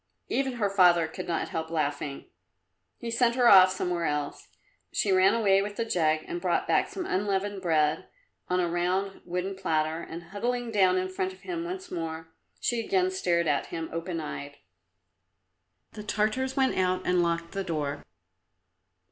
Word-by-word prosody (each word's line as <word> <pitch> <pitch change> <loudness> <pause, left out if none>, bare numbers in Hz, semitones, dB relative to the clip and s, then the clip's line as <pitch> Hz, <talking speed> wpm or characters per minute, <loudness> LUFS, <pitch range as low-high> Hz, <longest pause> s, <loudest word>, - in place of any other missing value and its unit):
Even 270 -1 0
her 225 -4 0
father 180 -4 +4
could 180 +3 -7
not 170 - -1
help 160 0 -3
laughing. 145 -3 -2 0.7
He 235 - -5
sent 235 0 +2
her 250 -2 +4
off 185 -3 +9
somewhere 180 -2 -1
else. 145 -1 -3 0.4
She 200 - +1
ran 190 +3 +5
away 195 -4 +4
with 205 +1 -4
the 230 - -1
jug 155 -7 +1
and 175 - -5
brought 180 -2 0
back - - +2
some 370 - -5
unleavened 200 - -1
bread 155 -3 +1 0.4
on 180 0 +2
a 175 - +1
round 180 +3 -1
wooden 180 +2 -2
platter, 160 -3 -1
and 170 +1 -8
huddling 240 +3 -2
down 190 -3 +4
in 185 0 0
front 185 0 -3
of 185 - -18
him 345 -2 -4
once 370 +1 -6
more, 165 -1 -5 0.3
she 240 - 0
again 185 -4 +1
stared 175 -2 +1
at 145 -2 +1
him 165 -1 -5
open 165 +1 -3
eyed. 145 -2 -6 1.3
The 210 - -8
Tartars 215 +6 -1
went 265 -1 +2
out 185 0 0
and 180 -1 +3
locked 170 0 -1
the 195 - -3
door. 150 -5 -3
185 Hz, 170 wpm, -28 LUFS, 165-205 Hz, 1.3 s, off